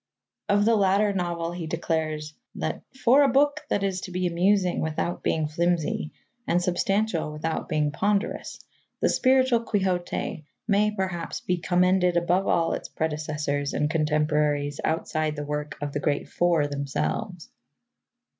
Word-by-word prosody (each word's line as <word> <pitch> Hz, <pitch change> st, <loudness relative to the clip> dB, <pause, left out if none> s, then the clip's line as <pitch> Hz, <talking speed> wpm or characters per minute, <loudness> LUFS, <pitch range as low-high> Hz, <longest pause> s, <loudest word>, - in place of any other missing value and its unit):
Of 205 Hz, 0 st, +3 dB
the 230 Hz, 0 st, +4 dB
latter 200 Hz, 0 st, +3 dB
novel 170 Hz, -2 st, -2 dB
he 175 Hz, -2 st, -5 dB
declares 155 Hz, -2 st, -2 dB, 0.2 s
that -, -, -3 dB, 0.2 s
"for 255 Hz, +2 st, +5 dB
a 285 Hz, -, +6 dB
book 290 Hz, +4 st, +3 dB
that 200 Hz, -, 0 dB
is 190 Hz, -2 st, -1 dB
to 185 Hz, -, -7 dB
be 180 Hz, +1 st, -1 dB
amusing 180 Hz, +2 st, +2 dB
without 160 Hz, +2 st, -2 dB
being 155 Hz, -1 st, 0 dB
flimsy, 170 Hz, -1 st, 0 dB, 0.4 s
and 175 Hz, -, +3 dB
substantial 180 Hz, -1 st, 0 dB
without 155 Hz, +1 st, -3 dB
being 150 Hz, -1 st, +1 dB
ponderous, 200 Hz, +6 st, -1 dB, 0.4 s
The -, -, +2 dB
Spiritual 260 Hz, -2 st, +3 dB
Quixote 185 Hz, -6 st, -1 dB, 0.2 s
may, 210 Hz, 0 st, +3 dB
perhaps, 190 Hz, -5 st, -3 dB
be 180 Hz, -, 0 dB
commended 180 Hz, 0 st, +2 dB
above 180 Hz, +3 st, +1 dB
all 165 Hz, -1 st, +2 dB
its -, -, -5 dB
predecessors 150 Hz, -2 st, -2 dB
and 150 Hz, +1 st, +1 dB
contemporaries 150 Hz, -2 st, +1 dB
outside 155 Hz, -1 st, -1 dB
the 150 Hz, -1 st, -4 dB
work 150 Hz, 0 st, -4 dB
of 145 Hz, -1 st, -3 dB
the 145 Hz, -, -1 dB
great 145 Hz, 0 st, -1 dB
Four 170 Hz, -4 st, +2 dB
themselves." 145 Hz, +6 st, -3 dB
170 Hz, 145 wpm, -26 LUFS, 150-195 Hz, 0.4 s, a